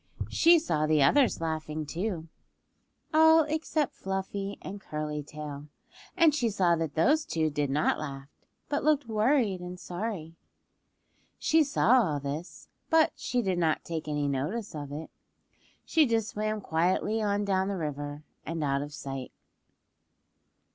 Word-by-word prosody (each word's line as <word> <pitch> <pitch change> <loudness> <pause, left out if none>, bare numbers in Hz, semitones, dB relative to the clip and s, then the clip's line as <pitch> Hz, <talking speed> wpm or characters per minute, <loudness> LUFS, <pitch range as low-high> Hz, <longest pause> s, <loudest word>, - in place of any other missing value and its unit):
She 340 +1 +6
saw 155 - 0
the 155 -2 +4
others 260 - +4
laughing, 155 -1 -3
too, 170 +1 -3 0.9
all 320 +1 +7
except 310 -1 -1
Fluffy 195 +1 -4
and 200 +1 -7
Curly 150 -3 -4
Tail, 150 -1 -8 0.5
and 330 -4 +6
she 250 -6 +1
saw 185 -5 +2
that 160 -3 -3
those 295 - +3
two 160 - -1
did 145 -1 -1
not 145 +3 +1
laugh, 140 -2 -6 0.4
but 290 - -1
looked 295 -2 +3
worried 220 -2 +2
and 180 0 -7
sorry. 175 -3 -5 1.0
She 320 0 +3
saw 260 -3 +4
all 150 -9 0
this, 145 +5 -6 0.2
but 320 -1 +4
she 245 -1 -1
did 185 -3 0
not 160 -2 +1
take 160 -2 -5
any 145 -1 -1
notice 150 - -2
of 145 -2 -6
it. 155 +3 -7 0.7
She 315 -3 +4
just 225 -1 0
swam 215 -1 -2
quietly 185 +6 +1
on 205 -1 0
down 190 -1 +1
the 200 -1 -2
river 145 -2 -4 0.2
and 165 0 -3
out 140 -1 +1
of 145 +1 -6
sight. 135 -2 -6
180 Hz, 145 wpm, -29 LUFS, 150-230 Hz, 1.0 s, all